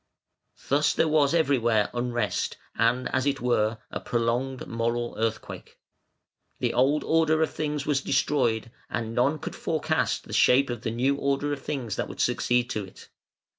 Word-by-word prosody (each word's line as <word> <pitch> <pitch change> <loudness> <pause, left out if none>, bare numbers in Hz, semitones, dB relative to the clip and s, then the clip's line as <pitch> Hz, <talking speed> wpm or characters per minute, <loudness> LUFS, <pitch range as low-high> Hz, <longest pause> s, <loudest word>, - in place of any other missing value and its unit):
Thus 145 +2 +2
there - - +3
was 150 -1 +3
everywhere 120 -9 +2
unrest 120 -3 -1 0.2
and, 120 +3 +1
as 130 +1 +1
it 140 -1 0
were, 110 -2 +1
a - - -3
prolonged 120 +3 -1
moral 115 +1 -2
earthquake. 115 0 -4 0.8
The - - -1
old 135 +5 +2
order 160 -1 +3
of - - -1
things 150 -2 -3
was 145 -2 +1
destroyed, 125 -5 0 0.2
and 115 -1 -3
none 135 +6 +2
could - - -7
forecast - - -1
the - - -10
shape 135 +1 +4
of 120 -2 -5
the 120 - -2
new 130 +5 +1
order 140 +1 0
of 140 - -6
things 130 -7 -4
that - - -2
would - - -9
succeed 120 0 +1
to 105 - -2
it. 95 - -14
125 Hz, 165 wpm, -26 LUFS, 115-140 Hz, 0.8 s, shape